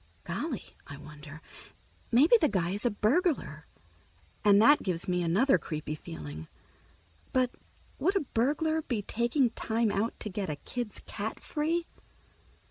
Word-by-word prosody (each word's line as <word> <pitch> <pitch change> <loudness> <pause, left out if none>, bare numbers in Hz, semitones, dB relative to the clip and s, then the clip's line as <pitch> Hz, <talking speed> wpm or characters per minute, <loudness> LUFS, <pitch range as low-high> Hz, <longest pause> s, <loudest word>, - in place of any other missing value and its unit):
Golly, - - -4
I 140 - -8
wonder, 150 +1 -11 0.7
maybe 285 - +6
the 305 - +4
guy 180 -3 0
is 205 +5 0
a - - +3
burglar, 220 - 0 0.8
and 205 -1 +6
that 290 +7 +6
gives 175 -3 -2
me 180 -1 +1
another 205 +12 +3
creepy 155 -2 -4
feeling. 80 - -8 0.9
But 255 -1 +2 0.5
would 390 - +2
a 390 - +3
burglar 300 +6 0
be 235 -8 -2
taking 240 +4 +1
time 225 -1 0
out 205 +4 -1
to - - -3
get 190 -2 -3
a 150 - -2
kid's 235 +8 -6
cat 215 +2 -5
free? 330 +3 -1
215 Hz, 140 wpm, -30 LUFS, 170-270 Hz, 0.9 s, maybe